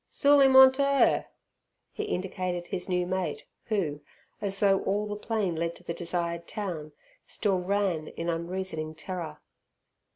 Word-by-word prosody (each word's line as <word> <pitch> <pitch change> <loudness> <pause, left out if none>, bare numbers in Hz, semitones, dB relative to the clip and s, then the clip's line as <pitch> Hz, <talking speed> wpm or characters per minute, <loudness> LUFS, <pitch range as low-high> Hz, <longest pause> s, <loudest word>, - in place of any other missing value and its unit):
"Sool 285 0 +5
'im 270 -1 +6
on 265 0 +10
t' 265 +2 -2
'er." 280 0 +3 0.6
He 425 - -4
indicated 180 - -3
his 185 0 -4
new 180 -1 +1
mate 180 -4 -3 0.2
who, 165 -10 -1 0.4
as 195 -1 -1
though 195 -1 +4
all 205 +2 0
the 210 0 -4
plain 210 -4 -1
led 170 +1 -2
to - - -17
the 170 - -4
desired 170 -1 -3
town, 165 -8 -5 0.3
still 195 -4 +1
ran 180 -4 0
in 165 - -6
unreasoning 170 -2 -3
terror. 175 0 -6
185 Hz, 155 wpm, -28 LUFS, 170-205 Hz, 0.6 s, on